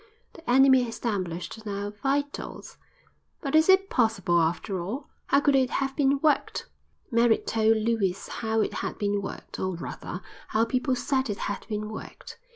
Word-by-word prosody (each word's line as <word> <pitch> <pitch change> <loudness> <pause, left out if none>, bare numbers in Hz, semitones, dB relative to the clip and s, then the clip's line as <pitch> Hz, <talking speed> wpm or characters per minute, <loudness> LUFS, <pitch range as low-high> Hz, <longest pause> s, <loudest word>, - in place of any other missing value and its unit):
The 325 - -11
enemy 265 +1 +6
established 195 -5 -3
in 215 -2 -6
our 200 +1 -3
vitals! 280 +7 -3 0.6
But 275 -4 -4
is 315 +3 +5
it 380 +1 +6
possible, 195 -8 +2
after 175 +3 -1
all? 250 - -5 0.2
How 280 - +4
could 285 -1 +3
it 260 -2 +3
have 270 0 -1
been 280 -1 +3
worked?" 305 -2 +1 0.5
Merritt 230 -1 +3
told 225 0 +3
Lewis 215 -4 0
how 220 -1 -1
it - - -1
had - - -4
been 205 -1 0
worked, 195 - -7
or 185 -1 -1
rather, 175 +2 -6 0.2
how 220 +1 +2
people 255 +2 0
said 265 0 0
it 205 - -2
had 205 - -4
been 210 -1 -2
worked. 220 - -9
225 Hz, 165 wpm, -27 LUFS, 205-270 Hz, 0.6 s, enemy